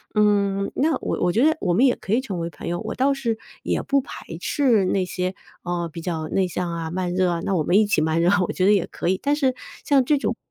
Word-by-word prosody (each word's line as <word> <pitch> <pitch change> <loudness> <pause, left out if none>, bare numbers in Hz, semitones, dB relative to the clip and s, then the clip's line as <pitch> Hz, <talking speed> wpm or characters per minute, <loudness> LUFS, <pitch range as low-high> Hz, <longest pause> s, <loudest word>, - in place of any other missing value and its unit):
嗯， 200 -2 +2
那 305 +2 +1
我 - - -2
我 180 - +2
觉 230 +8 +2
得， 315 +1 +4
我 175 -3 +1
们 250 +8 +5
也 250 - +4
可 205 - -4
以 250 - +3
成 195 -9 -5
为 170 0 -3
朋 - - -9
友。 175 0 -2
我 - - -5
倒 275 +2 +2
是 235 -5 -2 0.2
也 - - -1
不 275 -1 +2
排 - - -10 0.2
斥 240 -9 +2
那 185 0 +1
些， 185 +1 -3 0.3
呃， 175 -1 -2
比 165 - -6
较 160 -3 -3
内 190 -1 +1
向 180 -1 -3
啊、 165 -1 -4
慢 180 0 -2
热 185 -1 +2
啊， 170 -1 -1
那 195 - -1
我 155 - +1
们 185 - +3
一 215 - +5
起 205 -5 +1
慢 160 +1 +1
热， 175 +3 +3 0.2
我 - - -2
觉 185 - 0
得 205 - +6
也 200 -4 +2
可 - - -5
以。 185 +1 +1
但 285 +1 +1
是 265 -4 +1 0.3
像 275 -3 +4
这 290 +3 +2
种， - - -1
195 Hz, 290 characters per minute, -23 LUFS, 175-250 Hz, 0.3 s, 得